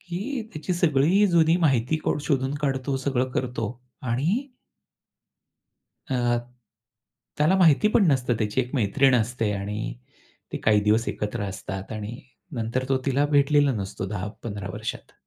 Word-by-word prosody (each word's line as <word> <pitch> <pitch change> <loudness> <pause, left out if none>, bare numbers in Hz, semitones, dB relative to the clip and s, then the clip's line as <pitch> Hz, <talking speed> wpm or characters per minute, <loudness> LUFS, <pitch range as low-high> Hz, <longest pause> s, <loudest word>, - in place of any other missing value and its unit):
की 200 +9 -4
त्याची 155 +3 -3
सगळी 170 +4 +3
जुनी 165 -1 +4
माहिती 130 +2 +1
को - - +1
शोधून 135 -1 0
काढतो 135 -1 0
सगळं 130 -1 -1
करतो 120 -4 -2 0.4
आणि 180 - 0 1.6
अ, 120 -2 +1 1.0
त्याला 155 +6 +4
माहिती 175 +2 +5
पण 210 -3 +4
नसतं 125 -2 +1
त्याची 105 +3 0
एक 125 +2 -5
मैत्रीण 130 +3 +3
असते 115 -2 0
आणि 100 - -4 0.6
ती - - -2
काही 105 -1 +4
दिवस 110 +2 +2
एकत्र 105 +1 -3
असतात 95 +1 -6
आणि 110 +3 -6 0.4
नंतर 115 +3 -1
तो 135 - +3
तिला 140 +2 +2
भेटलेला 145 -1 +3
नसतो 95 -3 -4
10-15 105 0 -5
वर्षात. - - -6
130 Hz, 135 wpm, -25 LUFS, 110-150 Hz, 1.6 s, माहिती